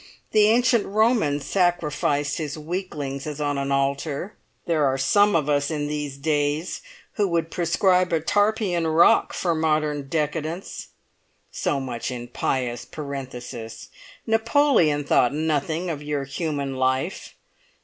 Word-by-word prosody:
The 210 -1 +5
ancient 235 0 +3
Roman 215 - +2
sacrificed 150 -4 0
his 150 -1 -4
weaklings 155 -4 -4
as 150 -1 -5
on 145 -1 -1
an 140 0 -2
altar; 140 +6 -1 0.3
there 160 -3 +1
are 135 -1 +2
some 205 +9 +3
of 155 -3 +1
us 145 -1 +1
in 150 -2 -2
these 150 -2 -4
days 150 +2 -1 0.4
who 205 -2 +2
would 165 -2 -1
prescribe 180 +1 +2
a 165 - +2
Tarpeian 205 -1 +1
Rock 160 +1 +4
for 175 -2 0
modern 155 -3 0
decadence. 155 +3 -3 0.6
So 140 - -1
much 125 -3 -4
in 120 -1 -6
pious 120 -1 -2
parenthesis! 125 -6 -7 0.4
Napoleon 225 - +3
thought 140 -1 +2
nothing 160 +3 -1
of 150 -2 -5
your 145 -1 -2
human 140 -1 -3
life. 130 +7 -1
150 Hz, 130 wpm, -24 LUFS, 140-175 Hz, 0.6 s, The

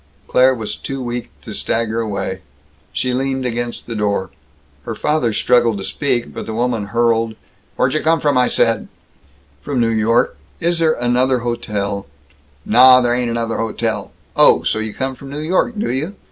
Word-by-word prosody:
Claire 130 +1 +4
was 110 -3 -4
too 135 0 -5
weak 120 -1 -4
to 110 - -7
stagger 115 +1 -1
away. 95 -3 -3 0.5
She 125 -1 -1
leaned 135 0 -1
against 120 0 -3
the 115 - -5
door. 100 -3 -1 0.5
Her - - -5
father 150 -6 +1
struggled 115 0 +2
to 95 - -5
speak, 125 +1 -1
but - - -6
the 110 - -4
woman 115 -3 -1
hurled: 115 0 +1 0.4
"Wherdjuhcomfromised!" 145 -1 +2 0.7
"From 140 -3 -2
New 115 -1 +3
York. 115 +1 +2 0.2
Is 170 0 0
there 160 -1 +3
another 125 0 +1
hotel 105 -5 -3 0.3
" 70 0 -34
"Nah, 125 +3 +7
there 120 -1 +2
ain't 125 -1 0
another 115 -1 -1
hotel! 115 -1 -2 0.2
Oh! - - +5
So - - 0
you 110 0 -3
come 130 +4 -3
from 135 +2 -11
New 140 - -6
York, 180 +9 0
do 205 - -1
you? 155 +10 -3
120 Hz, 160 wpm, -18 LUFS, 110-130 Hz, 0.7 s, Nah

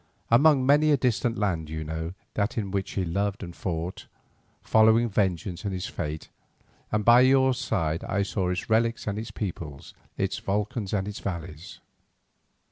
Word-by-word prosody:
Among 135 +2 +5
many 145 +3 +5
a 145 - +5
distant 120 -2 0
land 85 -7 -1
you 80 0 -4
know 80 +3 -5 0.2
that 110 +5 -1
in 100 -4 -2
which 100 -1 -2
he 95 - -1
loved 100 +4 -2
and 85 -2 -8
fought, 85 0 -4 0.6
following 110 +2 +5
vengeance 95 -3 -1
and 100 - -2
his 90 -1 -3
fate, 80 -1 -5 0.6
and 105 -1 0
by 120 +1 +8
your 130 0 +5
side 85 -10 -1
I 100 0 0
saw 95 -2 -1
its 90 0 -2
relics 115 +1 +1
and 105 0 -2
its 115 +1 -6
peoples, 85 -9 -6 0.2
its - - -1
volcans 105 +1 -2
and 100 -2 -1
its 105 - -5
valleys. 85 -3 -6
100 Hz, 165 wpm, -26 LUFS, 85-115 Hz, 0.6 s, by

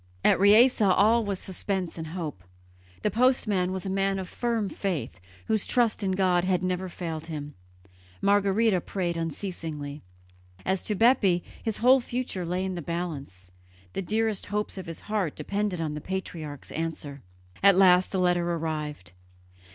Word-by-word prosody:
At - - +5
Riese 220 +5 +6
all 210 +4 +4
was 200 -2 -2
suspense 190 -1 -3
and 160 -1 -6
hope. 155 - -5 0.6
The 210 - +1
postman 215 -6 +2
was 190 +1 -4
a - - -2
man 195 0 +1
of 190 -1 -4
firm 230 -2 -1
faith, 175 - -3 0.3
whose 220 -2 0
trust 235 -3 +2
in 190 -2 0
God 185 -2 +2
had 185 -1 +1
never 185 0 -1
failed 165 -2 -5
him; 150 -2 -6 0.7
Margherita 200 0 +3
prayed 175 -2 -2
unceasingly. 160 -3 -5 0.6
As 190 0 0
to 210 - -1
Bepi 205 -6 +4 0.2
his 220 -2 -2
whole 255 +3 +6
future 240 -8 -3
lay 180 +2 -1
in 190 - -2
the 175 - -4
balance; 140 - -5 0.4
the - - -2
dearest 215 +2 -1
hopes 210 0 -2
of 190 -3 -7
his 165 - -6
heart 205 -7 -2
depended 200 -3 -2
on 160 -2 -2
the 150 0 -5
patriarch's 160 -6 -6
answer. 155 -4 -4 0.4
At 195 -1 +6
last 185 -1 +5
the 195 - -1
letter 175 -1 +2
arrived. 150 - -4
185 Hz, 160 wpm, -27 LUFS, 165-205 Hz, 0.7 s, Riese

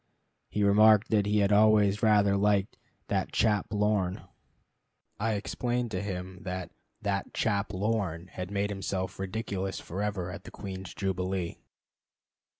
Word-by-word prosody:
He 105 - 0
remarked 105 +1 +6
that 105 -2 +3
he 105 0 +3
had 100 0 +2
always 105 -1 +5
rather 105 -3 +4
liked 100 0 +2 0.3
"that - - -1
chap 105 -2 +2
Lorne." 105 -3 0 1.0
I 110 +2 +1
explained 120 +3 -2
to 95 -3 -2
him 95 -2 -5
that 90 -1 -5 0.3
"that 100 -1 -2
chap 100 -1 0
Lorne" 95 -4 -1
had 90 0 -7
made 100 0 -1
himself 95 -2 -3
ridiculous 95 -1 -3
forever 95 -1 -3
at 90 - -8
the - - -9
Queen's 95 -2 -7
Jubilee. 95 -2 -2
100 Hz, 135 wpm, -29 LUFS, 95-105 Hz, 1.0 s, remarked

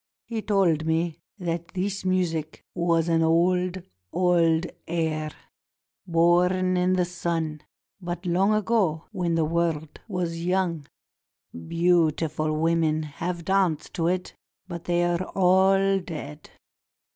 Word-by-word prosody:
He 225 -2 -4
told 180 -7 +2
me 165 0 0 0.2
that 170 -3 -3
this 195 +1 -2
music 170 -4 -1
was 170 -2 +1
an 165 -1 +2
old, 180 +2 +2 0.3
old 175 -2 +3 0.2
air, 160 -2 -1 0.8
born 180 +2 +3
in 180 +1 +2
the 180 -1 +2
sun 165 -3 -3 0.2
— - - -48
but 175 +1 -5
long 185 +4 +2
ago, 215 -7 +1
when 175 -5 -1
the 165 -1 +2
world 160 -2 -2
was 175 -4 -3
young. 175 -4 0 0.8
Beautiful 160 -2 +1
women 160 -1 +1
have 170 +3 -5
danced 185 -5 +1
to 165 -1 0
it, 180 +1 -1 0.3
but 170 -2 -7
they 175 0 +1
are 175 0 +1
all 195 +1 +3
dead. 155 -4 -8
175 Hz, 120 wpm, -25 LUFS, 165-185 Hz, 0.8 s, old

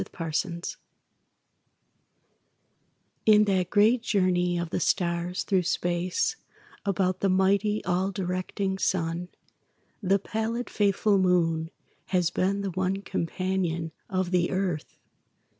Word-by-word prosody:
A - - -3
SOLAR 165 -2 -3
ECLIPSE 170 +2 -2 2.5
In 210 -1 +7
that 190 -3 +1
great 220 +4 +4
journey 180 -5 +1
of 170 -1 -3
the - - 0
stars 175 0 0
through 190 -2 +2
space 175 - 0 0.5
About 185 -2 0
the 195 - +1
mighty, 200 +3 +2
all 185 +1 +1
directing 190 +1 -2
Sun, 175 -1 -1 0.7
The 195 0 +3
pallid, 225 +4 -3
faithful 205 0 +2
Moon 165 -3 +2 0.4
has 180 -3 +1
been 200 +2 0
the 195 -1 -2
one 190 +2 -1
Companion 170 -2 -2 0.2
of 185 -1 -1
the 175 -2 +2
Earth. 185 -5 -2
185 Hz, 115 wpm, -27 LUFS, 175-200 Hz, 2.5 s, In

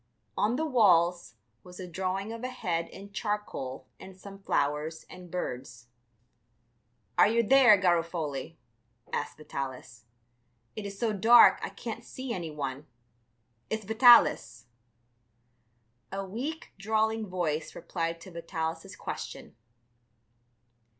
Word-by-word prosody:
On 215 +4 +1
the 315 +4 -1
walls 180 - +3 0.3
was 180 0 -13
a 185 - -6
drawing 190 +4 -3
of 230 +1 -8
a - - -1
head 170 -8 -2
in 200 +1 -11
charcoal 200 - -4
and 190 -1 -12
some 195 +1 -12
flowers 150 -2 -1
and 180 -1 -11
birds. 125 -8 -6 1.3
"Are - - +8
you 230 +2 +2
there, 245 -3 +6
Garofoli?" 165 -4 -1 0.6
asked - - -3
Vitalis; 130 -6 -7 0.7
"it 210 -2 -5
is 200 0 -9
so 220 0 0
dark 225 +4 +7
I - - -3
can't - - -7
see 260 -2 -6
any 175 -5 -4
one. 140 -2 -5 0.8
It's 220 -1 -3
Vitalis." 220 - +5 1.5
A 195 0 -4
weak, 260 +12 -6
drawling 220 +1 0
voice 160 -4 -2
replied 165 -1 -3
to 185 - -11
Vitalis' 165 -1 -5
question. - - -7
185 Hz, 115 wpm, -29 LUFS, 160-215 Hz, 1.5 s, Are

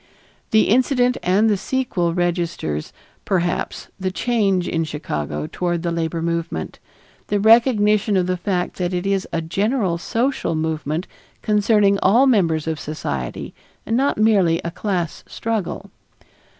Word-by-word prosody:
The 220 0 +4
incident 250 +1 +3
and 195 +5 +3
the 210 - +3
sequel 195 -6 -1
registers, 170 - -2 0.3
perhaps, 175 -2 -1
the 190 0 -1
change 195 -3 0
in 165 -1 0
Chicago 75 - -4
toward 175 -2 -2
the 170 - -1
labor 165 0 -2
movement, 165 - -3 0.5
the 205 - 0
recognition 215 -2 +4
of 180 - +2
the 185 0 0
fact 180 0 -2
that 180 0 -1
it 180 +2 -2
is 195 -1 0
a 165 -1 -2
general 195 +1 0
social 230 -3 -1
movement 155 +1 -2 0.4
concerning 210 -1 +3
all 235 +8 +5
members 170 - +2
of 160 -1 -2
society 70 - -5 0.3
and 225 - 0
not 275 +3 +1
merely 195 -6 +3
a 170 - -3
class 175 -5 -3
struggle. 220 -5 -4
185 Hz, 135 wpm, -21 LUFS, 165-215 Hz, 0.5 s, all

